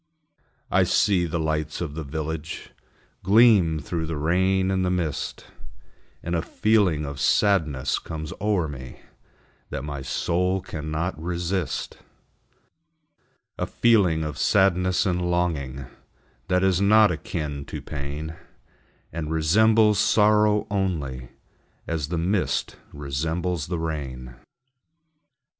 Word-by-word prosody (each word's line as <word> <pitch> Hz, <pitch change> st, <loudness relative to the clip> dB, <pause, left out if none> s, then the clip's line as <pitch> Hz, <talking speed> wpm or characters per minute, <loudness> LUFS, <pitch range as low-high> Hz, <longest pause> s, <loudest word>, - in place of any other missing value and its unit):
I -, -, +4 dB
see 90 Hz, -4 st, +2 dB
the 85 Hz, -, -2 dB
lights 80 Hz, -1 st, -2 dB
of 80 Hz, -5 st, -4 dB
the 80 Hz, +1 st, -5 dB
village 80 Hz, +2 st, -5 dB, 0.5 s
Gleam 100 Hz, -6 st, +5 dB
through 80 Hz, +2 st, -4 dB
the 80 Hz, -1 st, -3 dB
rain 95 Hz, +5 st, +1 dB
and 95 Hz, -1 st, +1 dB
the 90 Hz, -, +1 dB
mist, 85 Hz, -6 st, -3 dB, 0.8 s
And 85 Hz, -, -3 dB
a 85 Hz, -, +1 dB
feeling 95 Hz, -6 st, +1 dB
of 70 Hz, -1 st, -6 dB
sadness 75 Hz, -4 st, +2 dB
comes 80 Hz, -2 st, -6 dB
o'er 100 Hz, -6 st, +1 dB
me 65 Hz, -4 st, -9 dB, 0.7 s
That 70 Hz, -, -4 dB
my 70 Hz, -2 st, -5 dB
soul 90 Hz, +7 st, 0 dB
cannot 80 Hz, -1 st, -4 dB
resist: 90 Hz, +1 st, -3 dB, 1.6 s
A -, -, -1 dB
feeling 95 Hz, -9 st, +3 dB
of 75 Hz, -2 st, -5 dB
sadness 95 Hz, -2 st, +3 dB
and 90 Hz, -1 st, 0 dB
longing, 70 Hz, -7 st, -1 dB, 0.6 s
That 90 Hz, 0 st, +2 dB
is 95 Hz, -1 st, +2 dB
not 105 Hz, 0 st, +6 dB
akin 75 Hz, -4 st, -4 dB
to -, -, -6 dB
pain, 75 Hz, +2 st, -6 dB, 0.8 s
And 80 Hz, -2 st, -4 dB
resembles 105 Hz, +6 st, +4 dB
sorrow 105 Hz, 0 st, +4 dB
only 75 Hz, -11 st, -2 dB, 0.6 s
As 80 Hz, -4 st, -2 dB
the 85 Hz, +2 st, -3 dB
mist 90 Hz, +3 st, 0 dB, 0.2 s
resembles 80 Hz, +4 st, -2 dB
the 90 Hz, 0 st, -2 dB
rain. 70 Hz, -6 st, -5 dB
85 Hz, 115 wpm, -24 LUFS, 75-95 Hz, 1.6 s, not